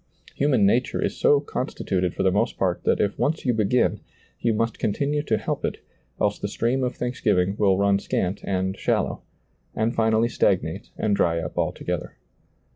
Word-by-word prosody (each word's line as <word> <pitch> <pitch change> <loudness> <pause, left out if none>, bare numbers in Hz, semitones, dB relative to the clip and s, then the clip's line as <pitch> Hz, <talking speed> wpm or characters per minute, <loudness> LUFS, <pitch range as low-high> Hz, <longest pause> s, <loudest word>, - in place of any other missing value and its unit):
Human 135 -7 +2
nature 120 +6 +2
is - - -1
so 145 - +4
con 140 -2 -3
stituted 90 -2 -2
for - - -1
the 95 - +3
most 100 - 0
part - - -1
that - - +2
if 100 -1 0
once 155 +1 0
you 125 - +3
begin, 110 +3 +2 0.4
you 115 - +1
must 115 +1 -1
continue 145 +7 0
to 115 -7 0
help - - -3
it, - - -2 0.4
else 105 0 +1
the - - -2
stream 120 +5 0
of 125 - -1
thanksgiving 105 -6 0
will 95 -3 +3
run 100 0 +3
scant 95 0 -2
and 95 0 -1
shallow,' - - -1 0.5
and 110 +2 0
finally 110 0 +2
stagnate 120 - 0
and 105 -2 +1
dry 85 -3 +2
up 80 -1 -5
altogether. - - -3
110 Hz, 180 wpm, -24 LUFS, 100-125 Hz, 0.5 s, so